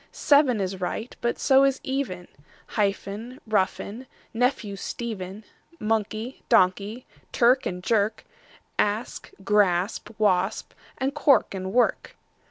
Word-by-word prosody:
Seven 285 Hz, -6 st, +3 dB
is 190 Hz, -1 st, -3 dB
right, 220 Hz, +6 st, -4 dB
but 235 Hz, -, 0 dB
so 270 Hz, 0 st, +5 dB
is 275 Hz, -1 st, +2 dB
even; 260 Hz, -10 st, -3 dB, 0.4 s
Hyphen, 210 Hz, +4 st, -2 dB
roughen, 215 Hz, +3 st, -1 dB, 0.3 s
nephew, 230 Hz, -4 st, 0 dB
Stephen; 200 Hz, -1 st, -6 dB, 0.4 s
Monkey, 220 Hz, +3 st, -2 dB
donkey; 200 Hz, +6 st, +2 dB, 0.3 s
clerk 250 Hz, +2 st, +3 dB
and 180 Hz, 0 st, -5 dB
jerk; 215 Hz, 0 st, 0 dB, 0.5 s
Asp, 210 Hz, +3 st, -1 dB, 0.2 s
grasp, 205 Hz, -1 st, +1 dB
wasp; 195 Hz, -2 st, +1 dB, 0.2 s
and 270 Hz, +1 st, -1 dB
cork 285 Hz, -5 st, +3 dB
and 190 Hz, 0 st, -4 dB
work. 245 Hz, +3 st, +1 dB
215 Hz, 110 wpm, -25 LUFS, 195-250 Hz, 0.5 s, so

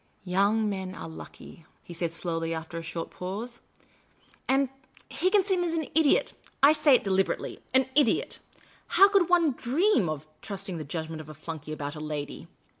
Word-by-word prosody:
" -, -, -38 dB
Young 200 Hz, +4 st, +2 dB
men 190 Hz, -2 st, -4 dB
are -, -, -7 dB
lucky," 160 Hz, 0 st, -11 dB, 0.2 s
he 175 Hz, -, -10 dB
said, 170 Hz, -1 st, -2 dB
slowly, 165 Hz, -1 st, -3 dB
after 160 Hz, +1 st, -6 dB
a -, -, -6 dB
short 165 Hz, 0 st, -5 dB
pause; 210 Hz, +7 st, -6 dB, 0.3 s
" -, -, -34 dB
— -, -, -27 dB
and 270 Hz, 0 st, +3 dB, 0.2 s
— -, -, -23 dB
Higginson 375 Hz, -1 st, +3 dB
is 335 Hz, -1 st, -1 dB
an 320 Hz, -, 0 dB
idiot. 315 Hz, -2 st, +3 dB, 0.3 s
I 290 Hz, +2 st, +8 dB
say 300 Hz, -3 st, +5 dB
it -, -, +2 dB
deliberately 195 Hz, -1 st, 0 dB
— -, -, -36 dB
an 260 Hz, 0 st, +5 dB
idiot! 290 Hz, +1 st, +3 dB, 0.6 s
How 395 Hz, -, +10 dB
could 390 Hz, -4 st, +3 dB
one 340 Hz, -4 st, +4 dB
dream 255 Hz, -, +2 dB
of 155 Hz, -1 st, -4 dB, 0.2 s
trusting 195 Hz, -3 st, -5 dB
the -, -, -4 dB
judgment 160 Hz, +2 st, -5 dB
of 155 Hz, -, -12 dB
a 155 Hz, -, -9 dB
flunkey 155 Hz, 0 st, -7 dB
about 145 Hz, -1 st, -4 dB
a -, -, -7 dB
lady 150 Hz, -2 st, -5 dB
190 Hz, 190 wpm, -28 LUFS, -, 0.6 s, How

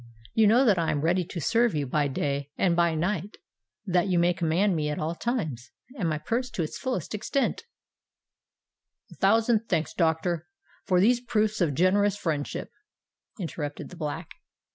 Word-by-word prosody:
You 220 Hz, -1 st, +5 dB
know 240 Hz, +6 st, +5 dB
that 205 Hz, -7 st, +4 dB
I 165 Hz, -, 0 dB
am 145 Hz, -, 0 dB
ready 175 Hz, +3 st, +2 dB
to 175 Hz, 0 st, -6 dB
serve 230 Hz, +4 st, +2 dB
you 145 Hz, -2 st, 0 dB
by 145 Hz, +2 st, +1 dB
day 140 Hz, +1 st, -2 dB
and 175 Hz, -3 st, +2 dB
by 170 Hz, -1 st, +2 dB
night—that 175 Hz, -, -3 dB
you 180 Hz, -2 st, +1 dB
may 175 Hz, +1 st, +3 dB
command 170 Hz, +3 st, +1 dB
me 150 Hz, -2 st, -1 dB
at 150 Hz, -, -2 dB
all 160 Hz, +2 st, -2 dB
times, 160 Hz, -, -3 dB, 0.3 s
and 190 Hz, -10 st, -1 dB
my 155 Hz, -, 0 dB
purse 240 Hz, -, -2 dB
to 175 Hz, -, -2 dB
its 155 Hz, -, -5 dB
fullest 250 Hz, -, -3 dB
extent——" 270 Hz, -, -1 dB, 1.5 s
"A -, -, -12 dB
thousand 225 Hz, +2 st, +3 dB
thanks, 160 Hz, -3 st, 0 dB
doctor, 170 Hz, 0 st, 0 dB, 0.4 s
for 180 Hz, -1 st, +3 dB
these 240 Hz, +5 st, +4 dB
proofs 215 Hz, -3 st, 0 dB
of 150 Hz, -5 st, +1 dB
generous 200 Hz, +4 st, +3 dB
friendship," 150 Hz, -6 st, -3 dB, 0.7 s
interrupted 150 Hz, -5 st, -5 dB
the -, -, -11 dB
Black. 160 Hz, 0 st, -5 dB
175 Hz, 165 wpm, -27 LUFS, 155-210 Hz, 1.5 s, You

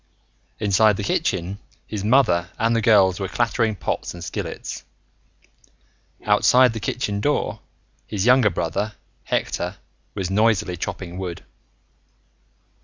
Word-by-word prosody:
Inside 105 Hz, 0 st, +3 dB
the 100 Hz, -, -3 dB
kitchen, 95 Hz, 0 st, -1 dB, 0.3 s
his 105 Hz, -3 st, -5 dB
mother 105 Hz, -7 st, +3 dB
and 115 Hz, +1 st, +1 dB
the 115 Hz, -, +2 dB
girls 100 Hz, -5 st, +4 dB
were 95 Hz, -, -2 dB
clattering 115 Hz, 0 st, 0 dB
pots 95 Hz, -, -3 dB
and 85 Hz, -, -8 dB
skillets. -, -, -5 dB, 1.4 s
Outside 120 Hz, +4 st, +5 dB
the 110 Hz, -, -4 dB
kitchen 105 Hz, -2 st, -2 dB
door, 145 Hz, +6 st, 0 dB, 0.5 s
his 100 Hz, -1 st, -2 dB
younger 125 Hz, -2 st, +5 dB
brother, 100 Hz, +5 st, -2 dB, 0.3 s
Hector, -, -, -2 dB, 0.4 s
was 95 Hz, -2 st, -3 dB
noisily 105 Hz, -3 st, +2 dB
chopping 90 Hz, +1 st, -5 dB
wood. 90 Hz, -3 st, -5 dB
105 Hz, 115 wpm, -22 LUFS, 95-115 Hz, 1.4 s, Outside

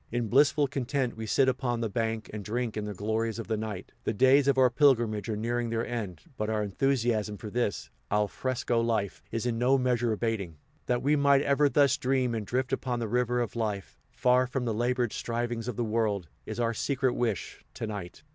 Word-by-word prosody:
In 120 Hz, -2 st, -1 dB
blissful 145 Hz, +3 st, +4 dB
content 130 Hz, -1 st, -2 dB
we 110 Hz, 0 st, -6 dB
sit 130 Hz, +5 st, +3 dB
upon 125 Hz, -2 st, 0 dB
the 115 Hz, -, 0 dB
bank, 110 Hz, 0 st, -2 dB
and 105 Hz, -1 st, -5 dB
drink 115 Hz, +2 st, -2 dB
in 105 Hz, -1 st, -3 dB
the 105 Hz, -, -4 dB
glories 110 Hz, +3 st, -1 dB
of 115 Hz, -, -5 dB
the 110 Hz, -, 0 dB
night. 105 Hz, -3 st, -5 dB
The 110 Hz, -, -1 dB
days 130 Hz, +4 st, +5 dB
of 140 Hz, -1 st, +3 dB
our 130 Hz, -2 st, +5 dB
pilgrimage 120 Hz, -6 st, +3 dB
are 110 Hz, -, 0 dB
nearing 120 Hz, +2 st, -1 dB
their 115 Hz, 0 st, -1 dB
end, 105 Hz, -7 st, -4 dB, 0.2 s
but 110 Hz, 0 st, -2 dB
our 110 Hz, -1 st, 0 dB
enthusiasm 110 Hz, -1 st, 0 dB
for 105 Hz, +1 st, -8 dB
this 120 Hz, -4 st, -2 dB, 0.2 s
al 105 Hz, 0 st, +2 dB
fresco 125 Hz, 0 st, -1 dB
life 110 Hz, -4 st, -1 dB
is 115 Hz, +1 st, -3 dB
in 115 Hz, -2 st, -1 dB
no 130 Hz, +3 st, +4 dB
measure 125 Hz, -2 st, +1 dB
abating. 105 Hz, -7 st, -2 dB, 0.3 s
That 125 Hz, 0 st, 0 dB
we 145 Hz, +3 st, +3 dB
might 140 Hz, -1 st, +4 dB
ever 140 Hz, +1 st, +3 dB
thus 140 Hz, -1 st, +4 dB
dream 130 Hz, -2 st, +1 dB
and 110 Hz, -3 st, -3 dB
drift 130 Hz, +1 st, -1 dB
upon 125 Hz, -2 st, -1 dB
the 115 Hz, -1 st, -2 dB
river 125 Hz, +2 st, +1 dB
of 120 Hz, -, -3 dB
life, 105 Hz, -4 st, -3 dB
far 125 Hz, 0 st, +3 dB
from 125 Hz, 0 st, -2 dB
the 115 Hz, -, 0 dB
labored 120 Hz, +1 st, 0 dB
strivings 120 Hz, 0 st, -3 dB
of 125 Hz, -, -3 dB
the 120 Hz, -, -1 dB
world, 105 Hz, -6 st, 0 dB, 0.2 s
is 110 Hz, +2 st, -5 dB
our 115 Hz, -1 st, +1 dB
secret 130 Hz, +1 st, 0 dB
wish, 115 Hz, -6 st, -2 dB
to -, -, -4 dB
night. 105 Hz, +3 st, -7 dB
120 Hz, 215 wpm, -29 LUFS, 110-130 Hz, 0.3 s, days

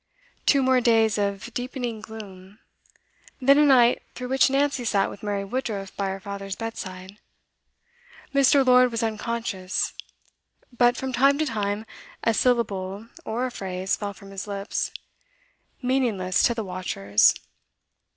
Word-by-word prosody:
Two 275 Hz, -2 st, +5 dB
more 260 Hz, -1 st, +3 dB
days 225 Hz, -3 st, +3 dB
of 200 Hz, +3 st, -2 dB
deepening 245 Hz, -3 st, -4 dB
gloom, 205 Hz, -3 st, -11 dB, 0.8 s
then 275 Hz, +2 st, +5 dB
a -, -, +6 dB
night 250 Hz, -4 st, +5 dB
through 250 Hz, -1 st, -6 dB
which 265 Hz, +1 st, +4 dB
Nancy 275 Hz, -1 st, +1 dB
sat 200 Hz, -4 st, +1 dB
with -, -, -11 dB
Mary 205 Hz, -1 st, -2 dB
Woodruff 200 Hz, -4 st, -4 dB
by 200 Hz, -, -1 dB
her 190 Hz, 0 st, -4 dB
father's 195 Hz, -1 st, -6 dB
bed. 225 Hz, +1 st, -5 dB, 1.6 s
Mr. 275 Hz, 0 st, +5 dB
Lord 250 Hz, 0 st, +6 dB
was 230 Hz, -1 st, -2 dB
unconscious, 220 Hz, -4 st, -2 dB, 0.8 s
but 245 Hz, 0 st, +4 dB
from 265 Hz, -1 st, -4 dB
time 275 Hz, +3 st, +4 dB
to 310 Hz, -, 0 dB
time 210 Hz, -3 st, -2 dB, 0.4 s
a 230 Hz, -, +3 dB
syllable 210 Hz, -3 st, 0 dB, 0.2 s
or 240 Hz, +2 st, -1 dB
a 255 Hz, -, -3 dB
phrase 190 Hz, -3 st, -2 dB
fell 205 Hz, -1 st, -5 dB
from 195 Hz, -1 st, -13 dB
his 195 Hz, +1 st, -6 dB
lips, 200 Hz, 0 st, -3 dB, 0.9 s
meaningless 235 Hz, -8 st, +1 dB
to 235 Hz, -, +3 dB
the 225 Hz, -, -3 dB
watchers. 180 Hz, -, +2 dB
225 Hz, 140 wpm, -25 LUFS, 195-250 Hz, 1.6 s, a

